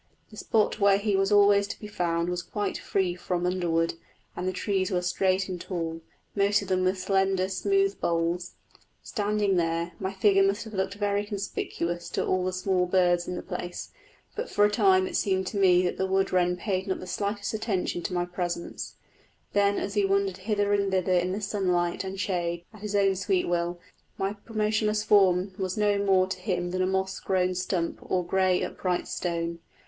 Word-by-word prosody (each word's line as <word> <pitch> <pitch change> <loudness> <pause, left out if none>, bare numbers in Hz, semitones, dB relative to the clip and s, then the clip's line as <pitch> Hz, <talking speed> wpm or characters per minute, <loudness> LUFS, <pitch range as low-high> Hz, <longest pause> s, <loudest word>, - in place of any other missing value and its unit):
The 215 - -12
spot 215 0 +1
where 200 -1 +5
he 205 0 0
was 195 +1 +1
always 200 0 +5
to 205 - -7
be - - -9
found 170 -4 -1
was 180 0 -2
quite 205 +3 -3
free 190 -3 0
from 180 0 -2
underwood, 170 -2 +1 0.4
and 180 - -3
the - - +1
trees 190 0 -1
were 180 -2 0
straight 185 +1 +1
and 180 -2 -5
tall, 165 -3 -4 0.3
most 205 0 +3
of 195 - -9
them 185 -1 +2
with 185 +1 +1
slender, 190 0 +1
smooth 195 +1 +1
boles. 170 +1 -1 0.5
Standing 205 -3 0
there, 170 0 0
my 190 0 -2
figure 195 0 +3
must 195 +2 +2
have 220 -1 -10
looked 190 0 -1
very 205 0 0
conspicuous 190 -4 -4
to - - -1
all 185 0 +1
the 185 - 0
small 185 0 0
birds 175 -1 +2
in 180 - -3
the - - -5
place; 175 0 -6 0.4
but 465 +3 -4
for 205 - +4
a 210 - +2
time 190 -4 +4
it - - -5
seemed 190 -1 +1
to 200 - -4
me 180 -2 +5
that 180 - -1
the 190 - +1
wood 190 0 +1
wren 180 -1 +2
paid 190 0 -2
not 190 - -1
the - - -7
slightest 200 +3 -3
attention 200 -5 -1
to 185 - -4
my 175 0 +1
presence; 175 -1 -4 0.6
that 200 0 +3
as 200 - -3
he 205 -1 +2
wandered 195 -1 +1
hither 205 +1 0
and 200 -1 +2
thither 185 -1 +1
in 180 +2 +1
sunlight 180 -4 0
and 190 0 -6
shade 175 -3 -2
at 215 - -14
his 210 -1 -3
own 195 -1 +3
sweet 190 0 0
will, 175 0 -1 0.4
my 195 +2 -1
motionless 215 -1 +1
form 190 -2 +4
was 185 0 -2
no 205 -1 +2
more 190 -2 +4
to 185 0 -5
him 180 -2 -2
than 185 0 -1
a 185 - +2
moss 190 0 -1
grown 185 -1 +1
stump 180 -2 -2
or 180 -1 -1
grey 185 0 +2
upright 180 -2 -2
stone. 170 -1 -3
190 Hz, 195 wpm, -27 LUFS, 180-200 Hz, 0.6 s, where